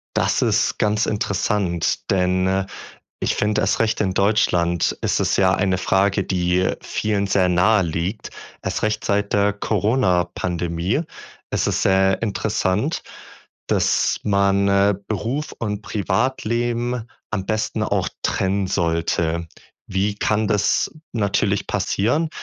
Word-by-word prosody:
Das - - +1
ist - - +1
ganz 105 +1 +1
interessant, 100 -4 -1
denn, 90 -1 +2
äh, 95 0 0 0.5
ich - - 0
finde, 105 0 +1
erst - - +1
recht 110 -1 +1
in 95 -3 0
Deutschland 90 -4 +2
ist - - +1
es - - +1
ja 95 -1 +4
eine 95 -2 +1
Frage, 95 +1 +2
die 90 0 +1
vielen 105 -2 -1
sehr 95 -1 +2
naheliegt. 90 0 +1 0.3
Erst - - -3
recht 110 0 -1
seit 100 0 0
der 100 0 +3
Coronapandemie 90 - 0 0.5
ist - - 0
es - - 0
sehr 95 +1 +3
interessant, 105 - -1 0.7
dass - - +2
man, 100 -1 +2
äh, 100 +1 +3
Beruf 120 +8 -2
und 105 -2 -3
Privatleben 120 +1 -1 0.2
am 105 -3 -2
besten 110 -1 -1
auch - - 0
trennen 95 0 0
sollte. 85 -1 0 0.4
Wie 100 +2 0
kann 105 +1 +1
das 105 -1 +1 0.2
natürlich 100 -2 0
passieren? 135 +11 0
100 Hz, 125 wpm, -21 LUFS, 95-105 Hz, 0.7 s, ja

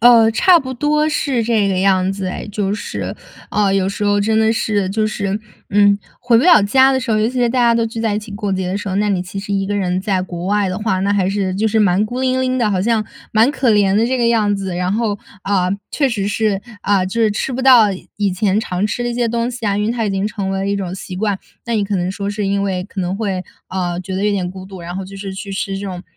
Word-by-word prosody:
呃， 230 -1 +7
差 350 +9 +5
不 260 -3 -5
多 300 +3 +1
是 270 -5 0
这 215 -3 +2
个 190 - 0
样 190 0 +2
子 195 -1 -4
哎。 185 - -5
就 205 -1 -1
是， 205 - -5 0.3
啊， 205 -2 +1
有 195 -1 +1
时 200 +1 -3
候 205 0 +2
真 220 +2 +2
的 220 0 +3
是 205 -4 0
就 215 +2 0
是， 200 -1 -2 0.3
嗯， 205 0 +4 0.2
回 240 -1 +3
不 240 - +4
了 350 -10 +7
家 265 +6 +5
的 260 - +2
时 250 -2 -4
候， 215 - +3
尤 215 - +2
其 255 +1 -4
在 240 - +3
大 255 +2 -1
家 235 -1 +4
都 230 0 +1
聚 225 0 -5
在 225 -2 0
一 210 - 0
起 210 0 -10
过 205 -1 -3
节 190 -1 -1
的 190 - -1
时 205 0 -5
候， 190 - -2
那 210 +1 +1
你 185 -3 0
其 185 +2 -7
实 200 +1 -4
一 195 0 0
个 205 - -2
人 185 -2 0
在 190 -2 0
国 180 -1 -5
外 205 -1 +1
的 185 - -3
话， 210 -3 0
那 200 +1 +1
还 190 -2 +1
是 195 -2 -1
就 210 +3 0
是 220 - +1
蛮 200 -1 +3
孤 245 +4 -4
零 260 0 +1
零 255 0 0
的， 215 -3 +2
好 185 -1 0
像 225 -1 +1 0.3
蛮 225 +4 +4
可 265 -5 +1
怜 200 -2 +3
的 225 - +3
这 260 0 0
个 235 - +2
样 215 -3 +2
子。 195 -2 -4
然 180 +1 -1
后， 215 -2 -1 0.2
啊， 185 -2 +1 0.2
确 280 -3 +2
实 205 -5 -2
是， 205 -1 0 0.2
啊， 200 -2 +2
就 230 +5 -2
是 215 - +3
吃 210 +6 -2
不 255 +1 -3
到 250 -5 +7 0.3
以 200 -3 0
前 195 +2 +1
常 185 0 -1
吃 240 - -3
的 240 - -1
一 240 - -3
些 240 0 +1
东 235 +1 -1
西 235 -2 -7
啊， 200 -1 +1
因 210 +1 0
为 230 - 0
它 235 -2 -1
已 205 - 0
经 195 +1 -1
成 200 -3 -3
为 195 - -1
了 195 - -2
一 200 - +1
种 185 -2 -4
习 190 -1 -7
惯。 205 0 -1 0.3
那 235 - -1
你 205 -2 +1
可 200 -1 -1
能 180 +1 -1
说 200 0 -4
是 205 0 -2
因 200 0 0
为 185 -2 -2
可 200 -1 -6
能 180 +1 -2
会， 195 -4 -2 0.3
啊， 180 -2 -2
觉 185 +1 -6
得 195 - -1
有 210 - +3
点 180 -3 -1
孤 185 0 -9
独， 190 -2 -10
然 175 +1 -6
后 195 - -4
就 195 +1 -10
是 195 -1 -6
去 195 +1 -7
吃 195 0 -3
这 200 - -5
种 180 -2 -6
205 Hz, 310 characters per minute, -18 LUFS, 195-225 Hz, 0.3 s, 呃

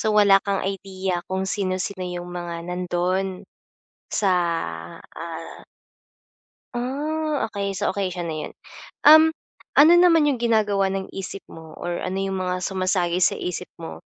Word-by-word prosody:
So, 215 -1 +1
wala 200 -2 +6
kang 200 -2 -2
idea 190 -2 -3
kung 190 0 -1
sino-sino 185 -1 -2
yung 175 0 -5
mga 170 -1 -5
nandun 180 +1 -2 0.6
sa, 200 -3 +1 0.7
ah 165 0 -8 1.1
Ah, 295 +5 -2
okey 200 -2 -3
so - - 0
okey 195 -2 0
siya 175 - -4
na 160 - -3
yun. - - -7 1.2
Ano 325 +4 +8
naman 335 -3 +6
yung 260 - -1
ginagawa 210 -4 +2
ng 195 0 -4
isip 195 +1 -6
mo 160 -1 -11
or 175 0 -4
ano 185 - -3
yung 195 -1 -2
mga 185 0 -2
sumasagi 185 -2 0
sa 180 - +3
isip 180 - -4
mo, 165 - -7
190 Hz, 140 wpm, -23 LUFS, 180-205 Hz, 1.2 s, Ano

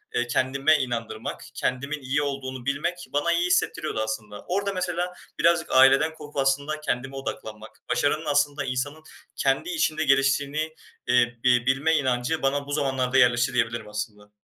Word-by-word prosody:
eee, 120 - +1
kendime 135 +5 +2
inandırmak, 115 -4 -4
kendimin 140 +4 -2
iyi 135 +3 0
olduğunu 130 -3 -4
bilmek 170 +6 -2
bana 145 +4 +1
iyi 170 +1 +1
hissettiriyordu 165 -6 0
aslında. 110 -1 -5
Orada 200 +2 -1
mesela 180 -1 -2 0.3
birazcık 170 0 +3
aileden 135 +4 +6
korkup 150 -2 -11
aslında 140 +3 +1
kendime 135 -2 -3
odaklanmak, 110 -5 -6 0.2
başarının 145 +6 +1
aslında 145 -1 +1
insanın 140 +4 -3 0.3
kendi 135 - 0
içinde 160 - 0
geliştiğini, 140 +3 +1 0.3
eee, 120 -1 +3
bi 125 -1 +4
bilme 135 +5 +2
inancı 130 +1 0
bana 140 +1 0
bu - - -6
zamanlarda 135 -3 0
yerleşti 125 -1 +4
diyebilirim 115 -2 -1
aslında. 105 -1 -6
135 Hz, 145 wpm, -25 LUFS, 125-155 Hz, 0.3 s, aileden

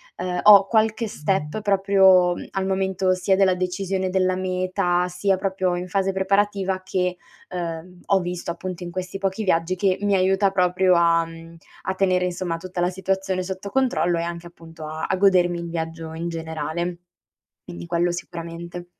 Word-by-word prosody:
ehm, 180 -1 -3
ho 205 -2 +9
qualche 220 +1 +1
step 190 0 -2
proprio, 190 -3 +4
mhmm, - - -8
al 190 0 -2
momento 190 -1 0
sia 185 +1 +1
della 190 -1 +3
decisione 185 +1 -2
della 185 0 +1
meta, 185 -1 0
sia 185 +2 0
proprio 190 -2 -1
in 180 +1 -4
fase 195 +1 0
preparativa 195 0 0
che, 180 -1 -1 0.3
ehm, 175 0 -6
ho 195 - +4
visto 175 -1 -4
appunto 185 +1 -6
in 175 - -6
questi 185 +1 -5
pochi 195 +2 -2
viaggi, 170 -1 +1
che 185 0 +1
mi 205 -1 +2
aiuta 190 +1 +3
proprio 185 0 +3
a, 170 -1 +3
mhmm, 165 0 -12 0.3
a 190 - -1
tenere 185 -1 +2
insomma 175 -1 -3
tutta 180 +1 -5
la 175 - +2
situazione 190 0 -2
sotto 190 +2 -6
controllo 240 -8 +1
e - - -1
anche 170 0 -5
appunto 165 -2 -12
a 155 +1 -4
a - - +2
godermi 180 -3 +3
il 170 0 -6
viaggio 165 -1 -5
in 165 +1 -4
generale. 165 +1 -4 0.7
Quindi 85 0 -8
quello 175 - +1
sicuramente. 170 0 -7
185 Hz, 170 wpm, -23 LUFS, 170-190 Hz, 0.7 s, ho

